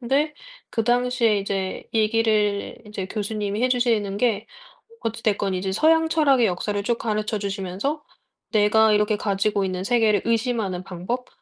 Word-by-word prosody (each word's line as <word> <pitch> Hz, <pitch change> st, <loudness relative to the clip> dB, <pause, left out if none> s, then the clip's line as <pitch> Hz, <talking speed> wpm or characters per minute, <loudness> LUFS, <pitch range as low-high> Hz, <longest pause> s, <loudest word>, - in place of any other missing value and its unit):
근데 280 Hz, +5 st, 0 dB, 0.4 s
그 225 Hz, -, -1 dB
당시에 245 Hz, -3 st, +2 dB
이제 195 Hz, -1 st, -3 dB
얘기를 215 Hz, -2 st, +1 dB
이제 200 Hz, -3 st, -5 dB
교수님이 210 Hz, +1 st, -3 dB
해주시는 235 Hz, -6 st, +1 dB
게 225 Hz, -3 st, +1 dB, 0.5 s
어찌 225 Hz, 0 st, -4 dB
됐건 200 Hz, -3 st, 0 dB
이제 190 Hz, +1 st, -2 dB
서양 320 Hz, +7 st, +3 dB
철학의 280 Hz, -7 st, +3 dB
역사를 200 Hz, +2 st, -2 dB
쭉 235 Hz, 0 st, 0 dB
가르쳐 215 Hz, -1 st, -2 dB
주시면서 200 Hz, -, -3 dB, 0.5 s
내가 215 Hz, +1 st, +4 dB
이렇게 210 Hz, 0 st, +2 dB
가지고 200 Hz, 0 st, 0 dB
있는 185 Hz, 0 st, -3 dB
세계를 220 Hz, -4 st, +2 dB
의심하는 225 Hz, -6 st, -1 dB
방법 195 Hz, +8 st, -4 dB
215 Hz, 330 characters per minute, -23 LUFS, 200-240 Hz, 0.5 s, 내가